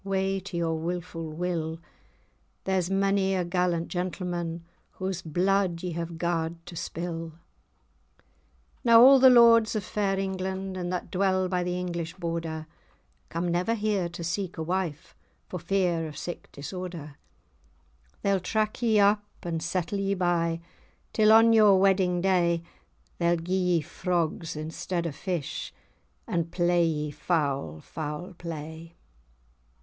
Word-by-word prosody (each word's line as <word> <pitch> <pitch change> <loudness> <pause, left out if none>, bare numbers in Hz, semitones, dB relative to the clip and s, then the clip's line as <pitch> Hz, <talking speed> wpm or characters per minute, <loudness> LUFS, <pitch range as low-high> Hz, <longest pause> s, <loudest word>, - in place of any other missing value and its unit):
Wae 195 0 0
to 195 -3 -5
your 165 -1 0
wilfu' 165 -1 -4
will! 165 0 -2 0.9
There's 185 -2 0
mony 195 0 +2
a 180 -2 0
gallant 175 -1 0
gentleman 175 -2 -3 0.3
Whae's 185 -1 -2
bluid 180 +1 +1
ye 180 - -2
have 170 0 -4
garred[#] 165 -1 -1
to 170 - -9
spill. 165 0 -5 0.8
[#] - - -45
caused. - - -33 0.6
Now 230 -1 +8
a' 270 0 +8
the 260 0 +8
lords 230 -3 +6
of 210 - -1
fair 195 0 -1
England, 190 0 -3
And 180 -1 -3
that 180 - -4
dwell 185 0 +2
by 180 -1 0
the 180 0 -2
English 170 -2 -4
Border, 165 -3 -4 0.6
Come 170 +2 -2
never 180 +7 +1
here 205 -5 0
to 170 0 -7
seek 175 +2 -3
a 160 - -2
wife, 175 -2 -3 0.3
For 180 - -5
fear 175 -2 0
of 150 - -9
sic[#] 175 - -7
disorder. 160 -1 -7 0.4
[#] 60 0 -36
such. - - -35
They'll 200 -1 +2
track 215 +5 -1
ye 220 -3 +3
up, 205 +1 +4 0.2
and 165 -2 -2
settle 180 +3 -2
ye 195 0 0
bye, 170 -2 0 0.5
Till 215 -1 +5
on 225 +1 +7
your 210 -4 +6
wedding 190 -2 +3
day; 170 -3 +2 0.6
Then 170 -1 +1
gie 180 - -2
ye 180 -3 +2
frogs 170 -1 -2
instead 160 +3 -3
of 155 -4 -3
fish, 175 -5 -4 0.5
And 170 -1 -2
play 175 -1 +3
ye 150 -2 -2
foul 140 - -1
foul 160 +4 -6
play. 165 0 -8
175 Hz, 145 wpm, -27 LUFS, 165-190 Hz, 0.9 s, Now